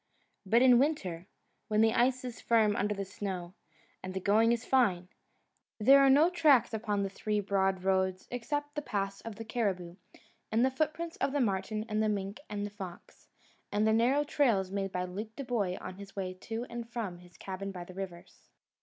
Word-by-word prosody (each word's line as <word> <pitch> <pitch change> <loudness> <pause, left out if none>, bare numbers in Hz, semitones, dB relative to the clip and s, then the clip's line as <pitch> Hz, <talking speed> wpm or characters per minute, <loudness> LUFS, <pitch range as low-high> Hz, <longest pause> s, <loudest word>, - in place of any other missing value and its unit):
But 235 +5 +5
in 250 -2 +7
winter, 190 - -1 0.4
when 215 -1 +2
the 225 0 +4
ice 255 +1 +2
is 245 -2 -7
firm 220 -3 +3
under 205 +1 0
the 195 0 -3
snow, 185 -2 -5 0.5
and 185 0 -6
the - - 0
going 215 +4 +4
is 235 0 -1
fine, 190 -9 +2 0.7
there 270 +6 +7
are 275 - +6
no 290 +5 +6
tracks 300 -10 +4
upon 210 -2 -1
the 195 - -2
three 210 +1 -1
broad 195 -2 0
roads 190 -1 0
except 290 +4 -3
the 295 - -3
paths 195 -6 -3
of 225 -2 -7
the 225 +2 -8
caribou, 190 -7 -2 0.5
and 225 +3 +3
the 265 - +1
footprints 315 +4 -2
of 275 - -1
the 290 - +1
marten 215 -1 -1
and 215 -1 0
the 215 - +2
mink 200 +1 -3
and 205 -1 -3
the 205 - -6
fox, 190 -4 -10 0.4
and 210 +1 +1
the 220 - +4
narrow 250 +6 +3
trails 230 -11 +1
made 195 -1 -2
by 180 -1 -2
Luke 210 +5 -6
Dubois 235 -9 -1
on 185 - -8
his 200 -1 -11
way 185 -2 -3
to 225 +5 -5
and 235 0 -7
from 215 -7 -4
his 175 -1 -17
cabin 195 +1 -5
by 180 -2 -7
the 185 - -12
rivers. 180 -2 -9
210 Hz, 200 wpm, -31 LUFS, 190-240 Hz, 0.7 s, in